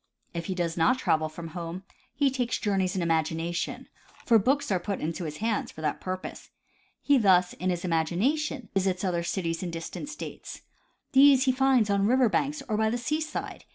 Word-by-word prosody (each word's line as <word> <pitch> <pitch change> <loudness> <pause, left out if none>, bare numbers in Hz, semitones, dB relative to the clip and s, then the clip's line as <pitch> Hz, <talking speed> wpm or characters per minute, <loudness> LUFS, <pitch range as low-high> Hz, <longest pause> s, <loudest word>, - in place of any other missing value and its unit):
If 170 -1 -4
he 190 - -2
does 170 -2 -2
not 165 +10 +3
travel 155 -10 +1
from 165 +1 -8
home 170 +2 -6 0.3
he 280 -2 +2
takes 245 -3 -1
journeys 195 -2 0
in 185 - 0
imagination, 165 +1 -1 0.4
for 230 -2 +6
books 270 +4 +1
are 185 - +2
put 195 +2 -3
into 165 +3 -3
his 150 -1 -5
hands 220 -1 -1
for 155 - -10
that 150 -2 -2
purpose. 185 0 -6 0.5
He 285 -2 +4
thus, 185 -4 +4
in 185 - -2
im 180 - +1
agination, 195 - -1
visits 190 -1 0
other 175 -3 0
cities 170 -1 -2
in 180 - -3
distant 165 - -6
states. 305 - -8 0.5
These 270 0 +6
he 260 - +4
finds 255 -5 +3
on 200 0 +2
river 255 0 +4
banks 280 +6 -1
or 215 -2 0
by 220 0 +2
the 235 - -1
seaside. 305 +6 -3
190 Hz, 190 wpm, -27 LUFS, 170-255 Hz, 0.5 s, for